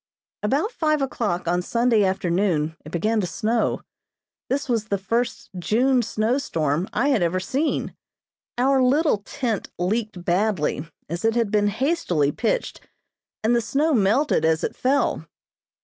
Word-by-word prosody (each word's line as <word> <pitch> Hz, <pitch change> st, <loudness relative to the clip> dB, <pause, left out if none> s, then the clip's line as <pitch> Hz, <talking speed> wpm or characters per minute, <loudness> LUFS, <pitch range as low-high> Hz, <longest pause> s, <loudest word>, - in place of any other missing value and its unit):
About 280 Hz, -, 0 dB
five 305 Hz, -7 st, +1 dB
o'clock 205 Hz, -9 st, -2 dB
on 175 Hz, +1 st, +1 dB
Sunday 230 Hz, +2 st, +2 dB
afternoon 175 Hz, -4 st, 0 dB
it 155 Hz, -, -10 dB
began 215 Hz, +6 st, +1 dB
to 180 Hz, -, -2 dB
snow. 225 Hz, +5 st, 0 dB, 0.7 s
This 275 Hz, +2 st, -1 dB
was 230 Hz, -4 st, 0 dB
the 200 Hz, -2 st, -1 dB
first 230 Hz, +6 st, -2 dB
June 250 Hz, +7 st, +2 dB
snowstorm 210 Hz, -, -1 dB
I 280 Hz, -, +1 dB
had 260 Hz, -8 st, +2 dB
ever 175 Hz, +2 st, +1 dB
seen. 275 Hz, +11 st, -1 dB, 0.6 s
Our 265 Hz, +2 st, +3 dB
little 275 Hz, -1 st, +3 dB
tent 220 Hz, +1 st, -3 dB
leaked 200 Hz, 0 st, -2 dB
badly, 175 Hz, -5 st, 0 dB, 0.2 s
as 170 Hz, +3 st, -5 dB
it 225 Hz, 0 st, +2 dB
had 230 Hz, -4 st, +1 dB
been 205 Hz, -1 st, +3 dB
hastily 205 Hz, -, +1 dB
pitched, -, -, -2 dB, 0.6 s
and 230 Hz, +2 st, +3 dB
the 235 Hz, -, +2 dB
snow 290 Hz, +7 st, +1 dB
melted 225 Hz, -, +2 dB
as 160 Hz, 0 st, +2 dB
it -, -, -2 dB
fell. 275 Hz, +2 st, 0 dB
220 Hz, 145 wpm, -23 LUFS, 180-260 Hz, 0.7 s, Our